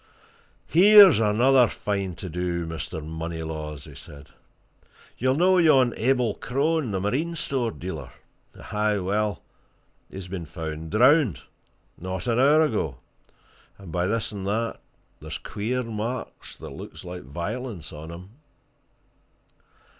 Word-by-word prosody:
"Here's 195 Hz, -, +8 dB
another 120 Hz, +4 st, +4 dB
fine 100 Hz, -5 st, -3 dB
to 95 Hz, -, -7 dB
do, 85 Hz, 0 st, -2 dB
Mr. 80 Hz, -1 st, -6 dB
Moneylaws!" 80 Hz, -2 st, -5 dB
said 70 Hz, -1 st, -12 dB
he. 65 Hz, -, -34 dB, 0.3 s
"You'll 130 Hz, +2 st, +2 dB
know 185 Hz, +4 st, +4 dB
yon 135 Hz, -8 st, +5 dB
Abel 125 Hz, -2 st, +1 dB
Crone, 140 Hz, +4 st, -1 dB
the 95 Hz, -2 st, -1 dB
marine 140 Hz, -, -1 dB
store 130 Hz, -6 st, -1 dB
dealer? 80 Hz, -, -7 dB, 0.6 s
Aye, 105 Hz, 0 st, +1 dB
well, 100 Hz, -1 st, -1 dB, 0.7 s
he's 95 Hz, -1 st, -8 dB
been 90 Hz, -3 st, -6 dB
found 80 Hz, -1 st, -6 dB
drowned, 125 Hz, -, +4 dB, 0.6 s
not 95 Hz, +1 st, -5 dB
an 120 Hz, -1 st, +1 dB
hour 150 Hz, +4 st, +5 dB
ago, 90 Hz, -, -2 dB, 0.8 s
and 95 Hz, -4 st, -11 dB
by 90 Hz, +1 st, 0 dB
this 115 Hz, +1 st, -1 dB
and 100 Hz, -2 st, -5 dB
that, 115 Hz, +3 st, -1 dB, 0.4 s
there's -, -, -6 dB
queer 115 Hz, +5 st, -3 dB
marks, 115 Hz, +2 st, -5 dB
that -, -, -9 dB
looks -, -, -10 dB
like 90 Hz, 0 st, -7 dB
violence, 85 Hz, -, -6 dB
on 75 Hz, +1 st, -9 dB
him!" 90 Hz, +3 st, -10 dB
105 Hz, 125 wpm, -25 LUFS, 85-125 Hz, 0.8 s, Here's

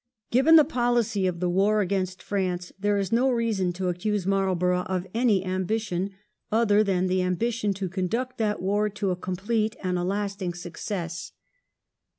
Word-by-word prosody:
Given 270 Hz, +7 st, +6 dB
the 310 Hz, -, +9 dB
policy 240 Hz, -7 st, +1 dB
of 175 Hz, -2 st, -2 dB
the 180 Hz, -, 0 dB
war 200 Hz, +4 st, +3 dB
against 185 Hz, -2 st, -1 dB
France, 180 Hz, -3 st, -2 dB
there 205 Hz, +1 st, +1 dB
is 195 Hz, -2 st, -1 dB
no 245 Hz, +3 st, +3 dB
reason 225 Hz, -7 st, 0 dB
to 185 Hz, +1 st, -3 dB
accuse 185 Hz, +2 st, -1 dB
Marlborough 185 Hz, -2 st, +1 dB
of 185 Hz, -1 st, -2 dB
any 220 Hz, -5 st, +2 dB
ambition 190 Hz, 0 st, -1 dB, 0.4 s
other 215 Hz, -1 st, +4 dB
than 185 Hz, -3 st, +1 dB
the 185 Hz, 0 st, +1 dB
ambition 210 Hz, +4 st, 0 dB
to 190 Hz, 0 st, -3 dB
conduct 215 Hz, +8 st, -2 dB
that 210 Hz, -3 st, 0 dB
war 205 Hz, +2 st, +1 dB
to 205 Hz, -2 st, -2 dB
a -, -, 0 dB
complete 210 Hz, +5 st, -1 dB
and 180 Hz, -1 st, 0 dB
a -, -, -1 dB
lasting 195 Hz, -1 st, -2 dB
success. 175 Hz, -1 st, -5 dB
195 Hz, 165 wpm, -26 LUFS, 180-215 Hz, 0.4 s, the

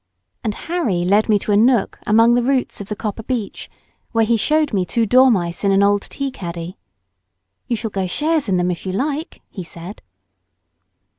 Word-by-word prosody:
And 215 Hz, -2 st, -2 dB
Harry 265 Hz, -, -1 dB
led 205 Hz, +4 st, +3 dB
me 210 Hz, -, +5 dB
to 205 Hz, -, -3 dB
a -, -, +4 dB
nook 230 Hz, +1 st, +2 dB
among 225 Hz, +3 st, +5 dB
the 245 Hz, -, +3 dB
roots 255 Hz, -3 st, -1 dB
of 200 Hz, -, -9 dB
the 210 Hz, -, -3 dB
copper 220 Hz, 0 st, -4 dB
beech, 225 Hz, -3 st, -4 dB, 0.4 s
where 225 Hz, -1 st, +3 dB
he 235 Hz, +1 st, +2 dB
showed 305 Hz, +4 st, +1 dB
me 190 Hz, -3 st, +1 dB
two 230 Hz, +5 st, 0 dB
dormice 220 Hz, -9 st, +3 dB
in 200 Hz, -, +3 dB
an 195 Hz, +1 st, +4 dB
old 205 Hz, 0 st, +3 dB
tea 275 Hz, +4 st, -5 dB
caddy. 170 Hz, -5 st, -7 dB, 0.9 s
"You 240 Hz, -, 0 dB
shall 225 Hz, -1 st, -4 dB
go 190 Hz, -2 st, -2 dB
shares 300 Hz, -, 0 dB
in 185 Hz, -, +2 dB
them 180 Hz, 0 st, +1 dB
if 175 Hz, -, -6 dB
you 185 Hz, -, -4 dB
like," 290 Hz, -, -3 dB
he 190 Hz, -, -6 dB
said. 170 Hz, +4 st, -9 dB
215 Hz, 195 wpm, -19 LUFS, 190-250 Hz, 0.9 s, me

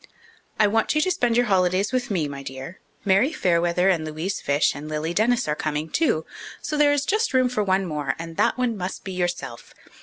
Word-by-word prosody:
_I 215 Hz, -, +6 dB
want 225 Hz, +7 st, +1 dB
you 305 Hz, -, +3 dB
to 370 Hz, -, +1 dB
spend 240 Hz, -8 st, +1 dB
your 245 Hz, -, +4 dB
holidays 190 Hz, 0 st, +2 dB
with 255 Hz, -1 st, -1 dB
me, 175 Hz, -7 st, 0 dB
my 140 Hz, -1 st, -7 dB
dear. 135 Hz, +6 st, -8 dB, 0.3 s
Mary 200 Hz, +9 st, +3 dB
Fairweather 175 Hz, -, +1 dB
and 175 Hz, -5 st, +2 dB
Louise 155 Hz, +5 st, -4 dB
Fyshe 145 Hz, +1 st, +2 dB
and 145 Hz, +2 st, -8 dB
Lily 155 Hz, +2 st, -2 dB
Dennis 230 Hz, +2 st, +2 dB
are 150 Hz, -, 0 dB
coming, 155 Hz, +1 st, -3 dB
too. 160 Hz, -, +1 dB, 0.3 s
So 305 Hz, -, -4 dB
there 295 Hz, -1 st, +4 dB
is 290 Hz, -1 st, +1 dB
just 430 Hz, -, 0 dB
room 255 Hz, -1 st, +4 dB
for 245 Hz, -4 st, -1 dB
one 190 Hz, 0 st, +1 dB
more, 150 Hz, -5 st, -2 dB
and 165 Hz, 0 st, -7 dB
that -, -, +2 dB
one 250 Hz, -3 st, 0 dB
must 185 Hz, -2 st, -5 dB
be 190 Hz, -, -6 dB
yourself. 175 Hz, -9 st, -4 dB
185 Hz, 215 wpm, -24 LUFS, 155-240 Hz, 0.3 s, I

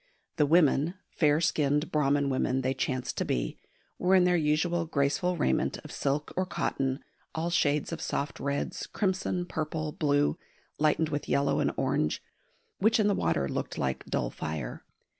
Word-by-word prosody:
The 150 Hz, -, +4 dB
women 160 Hz, +1 st, +4 dB, 0.2 s
"fair" 150 Hz, -2 st, +3 dB
skinned 150 Hz, -3 st, +1 dB
Brahman 140 Hz, -1 st, +2 dB
women 130 Hz, 0 st, +1 dB
they 130 Hz, +1 st, 0 dB
chanced 130 Hz, -1 st, -2 dB
to -, -, +1 dB
be -, -, -2 dB, 0.4 s
were 185 Hz, +1 st, +4 dB
in 185 Hz, -, +6 dB
their 180 Hz, 0 st, +3 dB
usual 165 Hz, +2 st, +1 dB
graceful 155 Hz, +5 st, +1 dB
raiment 65 Hz, -, +1 dB
of -, -, -8 dB
silk 145 Hz, +2 st, -1 dB
or 185 Hz, -, +1 dB
cotton, 135 Hz, -6 st, -2 dB, 0.3 s
all 165 Hz, +2 st, -1 dB
shades 150 Hz, -3 st, +1 dB
of -, -, -4 dB
soft 140 Hz, -, -3 dB
reds, 140 Hz, 0 st, -2 dB
crimson, 185 Hz, -2 st, -1 dB
purple, 155 Hz, -2 st, -3 dB
blue, 145 Hz, -1 st, +1 dB, 0.4 s
lightened 155 Hz, +1 st, +2 dB
with 145 Hz, -1 st, -3 dB
yellow 140 Hz, 0 st, +2 dB
and -, -, +2 dB
orange, 75 Hz, -, 0 dB, 0.6 s
which 220 Hz, +3 st, +4 dB
in 215 Hz, -, +3 dB
the 205 Hz, -, +3 dB
water 80 Hz, -, 0 dB
looked -, -, -4 dB
like 65 Hz, 0 st, -1 dB
dull -, -, -1 dB
fire. 75 Hz, -6 st, -5 dB
150 Hz, 160 wpm, -29 LUFS, 135-170 Hz, 0.6 s, in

